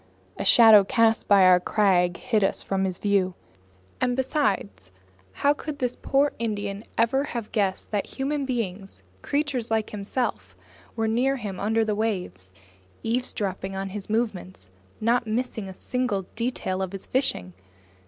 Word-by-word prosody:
A - - -4
shadow 220 -4 +8
cast 225 +3 +2
by 200 -2 +6
our 180 -1 +7
crag 180 -3 +2
hid 225 -5 0
us 195 - 0
from 195 0 -1
his 185 -2 -3
view. 195 -3 +1 0.7
And 250 -1 +1
besides, 260 - -1 0.4
how 285 - +2
could 295 0 -6
this 250 -3 -1
poor 280 +1 +1
Indian 205 -2 -3
ever 255 +4 +2
have 235 -6 -5
guessed 195 -4 -1
that 205 -2 -1
human 280 +2 -1
beings, 195 - -3 0.2
creatures 280 -5 -1
like 220 -1 0
himself, 200 - -3 0.4
were 225 -1 0
near 250 +5 +2
him 205 -7 -5
under 220 +2 +1
the 215 - 0
waters, 180 - -3 0.5
eavesdropping 205 -5 -2
on 195 0 -3
his 200 +1 -7
movements, 190 - -3 0.3
not 235 +1 +1
missing 220 -3 -2
a 190 - -9
single 250 -6 -2
detail 220 -5 -2
of 190 0 -3
his 195 - -7
fishing! 90 - 0
215 Hz, 150 wpm, -25 LUFS, 190-245 Hz, 0.7 s, shadow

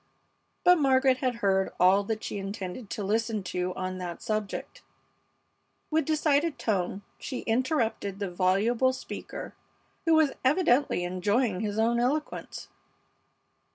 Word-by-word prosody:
But 360 -1 +6
Margaret 265 -2 +4
had 255 -2 -1
heard 190 -1 +2
all 190 +3 +5
that 220 +1 -3
she 205 - -4
intended 195 +2 -6
to 210 - -4
listen 220 +1 0
to 180 0 -2
on 185 0 -4
that 175 -2 -5
subject. 215 -2 -4 1.1
With 315 +1 +2
decided 305 0 +1
tone 195 -2 -1 0.2
she 260 - -5
interrupted 230 - 0
the 200 -3 -3
voluble 210 +8 +2
speaker, - - -7 0.5
who 330 -1 +5
was 315 -3 +4
evidently 270 - +3
enjoying 185 +4 0
his 210 0 -2
own 230 +2 +2
eloquence. 290 +6 -2
220 Hz, 125 wpm, -28 LUFS, 195-260 Hz, 1.1 s, But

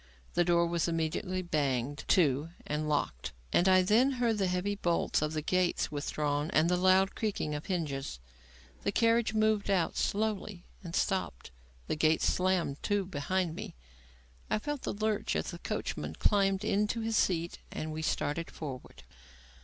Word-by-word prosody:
The 175 - +3
door 170 0 +3
was 170 0 0
immediately 170 +3 -1
banged 145 -4 -1
to 150 -3 +3 0.2
and 150 +1 -2
locked, 65 - -1 0.2
and 180 +2 +4
I 185 0 +6
then 235 +8 +4
heard 235 -4 +1
the 195 - +2
heavy 180 +3 0
bolts 175 -7 0
of 155 0 -1
the 155 -1 -2
gates 185 -1 +1
withdrawn 145 0 -1
and 155 +2 +4
the 180 - +3
loud 185 +1 +4
creaking 200 -8 -2
of 145 0 -5
hinges. 140 - -3 0.6
The 200 - 0
carriage 230 0 +2
moved 215 -1 +2
out 185 -4 +1
slowly 210 -3 -1 0.2
and 170 -2 -6
stopped; 185 - -1 0.3
the - - -1
gates 155 +1 +2
slammed 180 -6 +1
to 205 -2 0
behind 180 +1 -1
me; - - -7 0.7
I - - +2
felt 290 +4 -4
the - - -3
lurch 215 0 -1
as - - -2
the - - -8
coachman - - -4
climbed 195 -2 +2
to 210 +2 0
his 225 0 -1
seat 170 -4 +1
and 155 0 -4
we 155 - -4
started 160 +1 -1
forward. 135 -5 -8
180 Hz, 160 wpm, -31 LUFS, 155-205 Hz, 0.7 s, I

